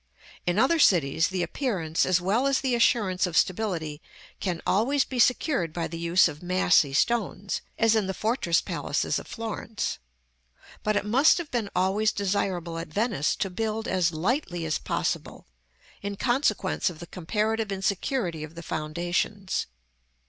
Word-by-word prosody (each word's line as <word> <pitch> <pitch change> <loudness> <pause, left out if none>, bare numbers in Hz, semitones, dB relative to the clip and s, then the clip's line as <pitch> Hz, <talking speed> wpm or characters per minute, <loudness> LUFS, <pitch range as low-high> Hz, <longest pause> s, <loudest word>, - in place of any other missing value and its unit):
In 175 +2 +1
other 295 +9 +3
cities, 160 - +4
the 185 -1 -2
appearance 170 - -1
as 185 -1 +3
well 210 +9 +1
as 275 -1 +2
the 265 -2 0
assurance 205 -6 +2
of 170 - -2
stability 170 -7 0 0.4
can 180 -4 -2
always 265 +8 +2
be 255 - -5
secured 245 - +2
by 170 -2 -2
the 165 +1 -7
use 170 +2 +4
of 145 - -8
massy 180 -5 +3
stones, 200 +4 0 0.2
as 225 0 +4
in 215 -3 +1
the 190 - -2
fortress 215 -7 +1
palaces - - -1
of - - -11
Florence; 225 -1 -4 0.8
but 215 0 0
it 205 - 0
must 265 +9 +5
have 340 -4 -5
been 230 -5 -1
always 195 +4 +2
desirable 185 -4 -1
at 165 - -5
Venice 200 - 0
to 195 - -2
build 220 +3 -2
as 175 -2 +1
lightly 175 - -1
as 155 - -1
possible, - - -3 0.6
in 200 0 -4
consequence 240 -2 +1
of 175 - -9
the 170 - -8
comparative 210 +5 -2
insecurity 195 - -1
of 155 +2 -9
the 170 - -8
foundations. 175 +6 -2
195 Hz, 155 wpm, -26 LUFS, 170-225 Hz, 0.8 s, must